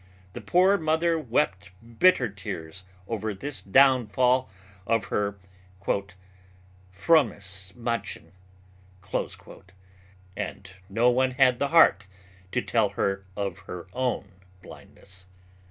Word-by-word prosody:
The - - -7
poor 190 +3 +3
mother 160 +1 +1
wept 115 - -1 0.3
bitter 180 -9 +5
tears 90 -3 -8 0.2
over 110 -2 -3
this 140 +8 -6
downfall 130 +1 +3 0.4
of 115 -4 +1
her 100 0 -1 0.4
"frommes 95 -1 -2 1.6
Madchen" 120 -1 -4 2.0
and 95 -1 -6 0.2
no 115 +5 +3
one 130 +1 +2
had 125 -1 +3
the 140 - +1
heart 120 - +5 0.4
to 125 - -1
tell 110 -4 +1
her 95 -1 -1
of 100 -1 -3
her 90 -1 -7
own 125 -6 -2 0.3
blindness. 95 -1 -15
115 Hz, 100 wpm, -26 LUFS, 100-130 Hz, 2.0 s, bitter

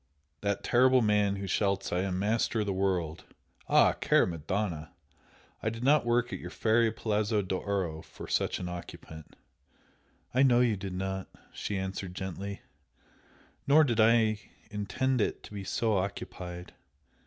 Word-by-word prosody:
That 100 +2 -1
terrible 130 0 +4
man 105 -2 +2
who 100 0 -5
shouts 100 0 0
'I 90 - +1
am 95 -1 -1
master 110 +3 +1
of - - -1
the 100 - -1
world'! 90 -4 -1 0.5
ah, - - +6
cara - - +3
Madonna! 85 -1 -3 0.7
I 110 - 0
did 115 +2 -6
not 145 -1 +4
work 120 0 +1
at - - -4
your - - -7
fairy 115 0 +2
Palazzo 105 -1 0
d'Oro 95 -3 -2
for - - -11
such - - 0
an 90 - -5
occupant!" 85 -3 -9 1.0
"I 130 - +3
know 125 -3 +5
you 120 -3 +3
did 95 -1 -5
not;" 95 0 -3 0.3
=she 100 - -3
answered, 95 -1 -4
gently 95 +2 -5 1.0
"Nor 150 +3 +7
did 120 -5 0
I 110 -1 +4 0.3
intend 110 +5 0
it - - -1
to - - -11
be 100 -1 -5
so 110 +2 0
occupied. 90 -2 -4
100 Hz, 155 wpm, -30 LUFS, 95-115 Hz, 1.0 s, Nor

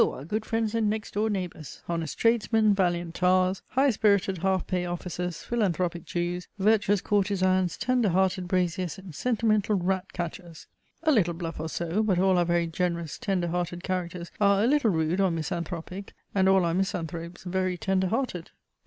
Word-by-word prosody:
our 135 - 0
good 215 +6 -2
friends 225 -1 0
and 225 -2 +1
next 215 0 -3
door 215 +2 +1
neighbours 180 -7 -5
honest 165 -3 -3
tradesmen, 225 -2 +3
valiant 175 -3 0
tars, 185 +1 +2
high 270 +1 +3
spirited 200 -4 +2
half 190 +1 +1
pay 180 -1 -1
officers, 175 0 -4
philanthropic 180 -7 -1
Jews, 175 +1 -3
virtuous 205 -1 +3
courtezans, 185 -3 +1
tender 245 -1 +1
hearted 185 0 +1
braziers, 180 0 -1
and 190 -3 -10
sentimental 215 0 +1
rat 190 0 -1
catchers! 170 -1 -6 0.4
(a 315 - +4
little 180 - +2
bluff 165 -2 -5
or 160 +1 -3
so, 170 +6 -1
but 205 -5 +1
all 185 0 +3
our 175 - +3
very 170 0 +2
generous, 170 -1 -2
tender 190 -7 -1
hearted 175 0 -3
characters 180 -2 -3
are 200 0 +4
a - - +4
little 275 -2 +3
rude 165 +1 +1
or 190 - +3
misanthropic, 170 +3 -4 0.2
and 190 -1 +3
all 190 -2 +4
our 165 - 0
misanthropes 170 -2 -3
very 185 0 -1
tender 190 +1 +1
hearted.) 220 -5 -2
185 Hz, 170 wpm, -27 LUFS, 175-205 Hz, 0.4 s, a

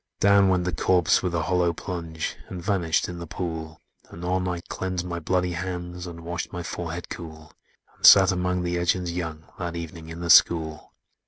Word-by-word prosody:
"Down 100 -1 +5
went 90 -1 +2
the 90 - -1
corse 90 +2 +3
with 90 -2 -2
a 80 - 0
hollow 90 0 +1
plunge, 85 -2 -5
And 90 - -6
vanished 85 -3 0
in 90 -1 -7
the 85 - -7
pool; 80 -1 -5 0.3
Anon 90 +2 -2
I 90 -1 -3
cleansed 90 0 -4
my 85 -1 -4
bloody 90 +2 0
hands, 90 0 -5
And 85 -1 -9
washed 85 +1 -5
my 90 - -5
forehead 85 0 -5
cool, 80 -2 -9 0.4
And - - -27
sat 95 -1 +9
among 90 0 -1
the 85 0 -1
urchins 90 0 0
young, 80 -2 -4 0.2
That 85 -2 -4
evening 85 -1 -7
in 85 +1 -8
the 85 -1 +2
school. 80 -3 +4
85 Hz, 185 wpm, -25 LUFS, 85-90 Hz, 0.4 s, sat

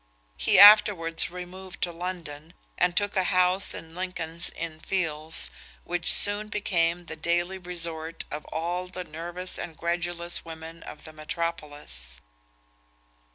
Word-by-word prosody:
He - - +3
afterwards 195 -5 +7
removed 180 +1 -8
to 175 - +1
London, 170 -2 -7 0.2
and 180 0 +1
took 205 0 +1
a 190 -1 +2
house 185 +1 +3
in 160 0 -10
Lincoln's 170 -2 -4
Inn 160 -2 -6
Fields, 160 -3 +1 0.3
which 175 0 +2
soon 205 +1 +1
became 175 -5 0
the 160 - -7
daily 175 +4 0
resort 165 -2 -5
of 150 +1 -5
all 175 +3 -3
the 180 0 -6
nervous 175 +3 -5
and 160 -3 -6
credulous 175 0 -1
women 165 0 -9
of 150 - -10
the 155 - -11
metropolis. 150 - -4
170 Hz, 130 wpm, -27 LUFS, 160-180 Hz, 0.3 s, afterwards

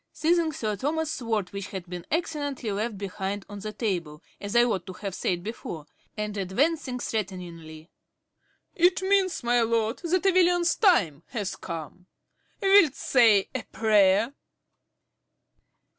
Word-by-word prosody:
~Roger~ - - -45 0.2
(_seizing 325 -3 0
Sir 215 -2 -2
Thomas's 310 +7 -1
sword, 220 -7 -2
which 200 -1 -5
had 185 -2 -7
been 175 -1 -7
accidentally 290 -7 -2
left 210 +2 -2
behind 195 0 -4
on 205 0 -8
the 215 +2 -5
table, 175 -9 -3 0.2
as 200 +1 -5
I 240 - +7
ought 195 -6 -1
to 185 - -6
have 195 0 -6
said 175 -1 -2
before, 175 -7 -6 0.3
and 210 -1 -3
advancing 255 - 0
threateningly_). 175 -8 -5 0.9
It 360 +2 +3
means, 380 -5 +2
my 240 0 +3
lord, 230 0 0
that 365 +2 0
a 385 - +6
villain's 350 -1 +3
time 205 - +3
has 205 -6 -4
come. 170 +1 -8 0.6
Wilt 390 -7 +6
say 225 -6 +4
a - - -2
prayer? 210 +2 +3
215 Hz, 145 wpm, -26 LUFS, 190-290 Hz, 0.9 s, I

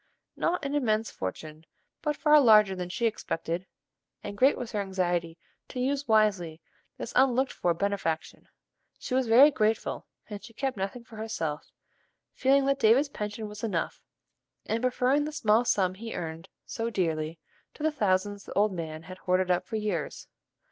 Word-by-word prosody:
Not 335 -4 -1
an 280 - -2
immense 225 -6 +1
fortune, 155 +12 -6 0.4
but 300 -1 -1
far 300 -1 +6
larger 210 -5 +6
than 180 -1 -5
she 235 +6 -2
expected, 180 -4 -2 0.6
and 205 - -6
great 265 +6 +4
was 240 -2 -5
her 210 -3 -1
anxiety 175 -3 -1 0.3
to 255 - -6
use 275 +2 -1
wisely 200 -8 +2 0.4
this - - -6
unlooked 260 0 +3
for 175 - 0
benefaction. 195 -4 -3 0.5
She - - -6
was 260 -1 +2
very 260 +7 +8
grateful, 220 -4 -1 0.2
but 205 -2 -8
she 230 - -12
kept 270 +2 -2
nothing 195 +5 -4
for 225 -1 -14
herself, 170 -9 -4 0.6
feeling 275 +1 +3
that 275 0 +1
David's 260 +5 +4
pension 210 -3 -5
was 210 +1 -10
enough, 190 -7 -2 0.6
and 225 +1 -1
preferring 255 +3 +2
the 305 - -4
small 235 -6 +2
sum 185 -5 +2
he 225 +4 -7
earned 165 +2 -6 0.2
so 230 0 -3
dearly 165 -6 -1 0.4
to - - -8
the 315 - +2
thousands 205 -5 0
the - - -8
old 205 0 +2
man 160 -2 -5
had 185 +2 -10
hoarded 185 0 +1
up 180 - 0
for - - -5
years. 210 -8 -3
215 Hz, 170 wpm, -28 LUFS, 180-250 Hz, 0.6 s, very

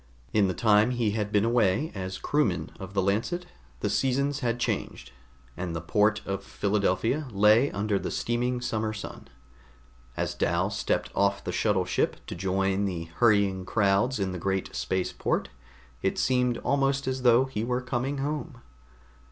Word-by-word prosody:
In 105 -2 +4
the 90 - -2
time 105 +4 +4
he 120 -4 0
had 105 -1 -2
been 105 +1 +3
away 115 +4 +2
as 95 -1 -5
a - - -16
crewman 150 0 0
of 95 0 -8
the 95 - +2
Lancet, 115 - 0 0.4
the - - 0
seasons 140 +2 +1
had 120 -3 -1
changed, 120 - -3 0.4
and 90 -2 -4
the - - -1
port 105 +6 +1
of 95 0 -3
Philadelphia 105 +9 0
lay 105 +6 +5
under 100 0 -1
the - - -4
steaming 120 +1 -1
summer 110 -2 -1
sun. 110 - -8 0.9
As - - -1
Dal - - 0
stepped - - -1
off 100 0 +1
the 90 - -3
shuttle 95 0 +1
ship 95 - 0
to - - -6
join 95 +1 0
the 85 -4 -4
hurrying 100 -5 +3
crowds 105 +5 +2
in 95 -1 -1
the 90 - -5
great 95 +2 -2
space 95 -1 -1
port, - - -1 0.5
it - - 0
seemed 125 -2 +2
almost 140 0 +1
as 130 0 -1
though 125 +1 +5
he 130 -5 -4
were 125 +1 0
coming 130 +2 -2
home. 145 -1 -3
105 Hz, 170 wpm, -27 LUFS, 95-125 Hz, 0.9 s, lay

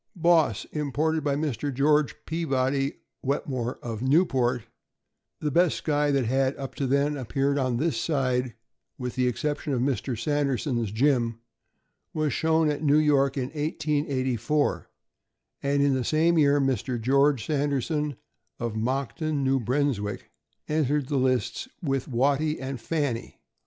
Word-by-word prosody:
Boss, 165 - +3
imported 155 +1 -1
by 145 -1 +1
Mr. 145 -1 -2
George 150 +2 +2
Peabody 135 -4 0 0.3
Wetmore, 130 -3 -2
of 115 -2 -5
Newport, 130 -4 +2 0.8
the 150 - -1
best 175 +2 +3
Skye 150 -1 +1
that 135 -3 +2
had, 130 +3 +1
up 135 -1 -6
to 135 - -2
then, 140 +3 +2
appeared 140 +2 0
on 130 -3 0
this 160 +5 0
side, 130 -5 0 0.4
with 125 -2 -4
the 125 -1 +1
exception 145 +4 -2
of 125 - 0
Mr. 130 -2 -1
Sanderson's 135 -6 0
Jim, 120 -1 +1 0.8
was 155 -2 0
shown 160 0 +2
at 145 0 -4
New 150 -1 +4
York 140 -3 +3
in 130 -1 -1
1884, 145 -3 -1 0.7
and 140 0 +1
in 140 -1 +3
the 130 -1 0
same 160 +5 +2
year, 145 -2 +4
Mr. 130 -2 0
George 135 +1 +2
Sanderson, 145 0 -1 0.4
of 115 -2 -3
Moncton, 135 +5 -1
New 135 0 +2
Brunswick, 120 -5 -1 0.4
entered 150 -2 0
the 145 - +1
lists 130 - 0 0.2
with 135 -4 -1
Watty 140 +5 +1
and 135 -2 -5
Fanny. 145 -5 -2
140 Hz, 135 wpm, -26 LUFS, 130-150 Hz, 0.8 s, New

